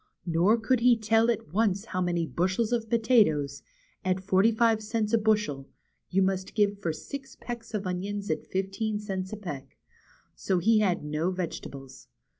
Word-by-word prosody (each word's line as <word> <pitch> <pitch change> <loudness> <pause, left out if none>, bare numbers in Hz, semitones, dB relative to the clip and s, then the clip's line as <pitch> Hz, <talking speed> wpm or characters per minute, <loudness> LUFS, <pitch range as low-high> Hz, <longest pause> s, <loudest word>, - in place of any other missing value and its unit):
Nor 175 +6 +3
could 235 +2 +1
he 240 0 +5
tell 225 +1 +3
at 205 -9 -2
once 200 -1 +1
how 185 -5 -3
many 175 -2 0
bushels 190 +8 0
of 225 -2 -1
potatoes, 210 - +3 0.4
at 185 0 +1
forty 190 +3 +3
five 225 -1 +2
cents 215 0 -2
a - - +6
bushel, 210 -11 0 0.4
you 195 +1 +3
must 190 0 -2
give 205 -2 +2
for 170 -5 -1
six 270 - -8
pecks 230 -2 -6
of 205 -2 -3
onions 195 +2 -3
at 155 - -3
fifteen 195 +3 -2
cents 190 -3 -4
a 215 - -5
peck. 145 -10 -8 0.6
So 190 - -1
he 215 +5 +4
had 190 -7 +1
no 150 +4 -1
vegetables. 155 -7 -6
200 Hz, 170 wpm, -28 LUFS, 180-225 Hz, 0.6 s, a